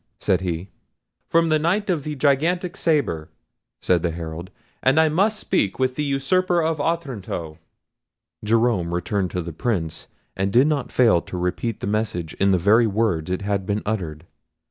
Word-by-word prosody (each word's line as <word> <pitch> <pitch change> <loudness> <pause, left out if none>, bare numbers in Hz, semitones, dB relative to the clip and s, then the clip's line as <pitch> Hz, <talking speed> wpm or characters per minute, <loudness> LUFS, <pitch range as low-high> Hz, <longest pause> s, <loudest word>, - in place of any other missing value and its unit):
said 95 - +1
he. 90 +1 -4 0.6
"From 165 0 +3
the 155 0 +3
Knight 185 +7 +1
of 170 -7 0
the 150 0 -4
Gigantic 165 +6 +1
Sabre," 140 - 0 0.5
said 90 -2 +3
the 85 - 0
Herald; 80 +1 -6 0.3
"and 135 +4 +4
I 160 -1 +5
must 205 +7 +1
speak 100 - 0
with 130 -1 +1
the 150 - -2
usurper 170 +6 +1
of 160 -2 0
Otranto." 115 - -3 0.8
Jerome 110 -6 +1
returned 95 +1 -1
to 90 +1 -3
the 85 0 -7
Prince, 85 -4 -2 0.3
and 95 +1 -1
did 125 +5 +5
not 150 -4 -1
fail 110 -9 +4
to 90 - -7
repeat 90 +5 -2
the - - -3
message 100 -6 -2
in 100 - +3
the 95 - +4
very 110 +6 +4
words 100 -6 0
it 95 +2 -2
had 100 -1 -1
been 105 0 -1
uttered. 85 -7 -3
110 Hz, 170 wpm, -23 LUFS, 90-150 Hz, 0.8 s, I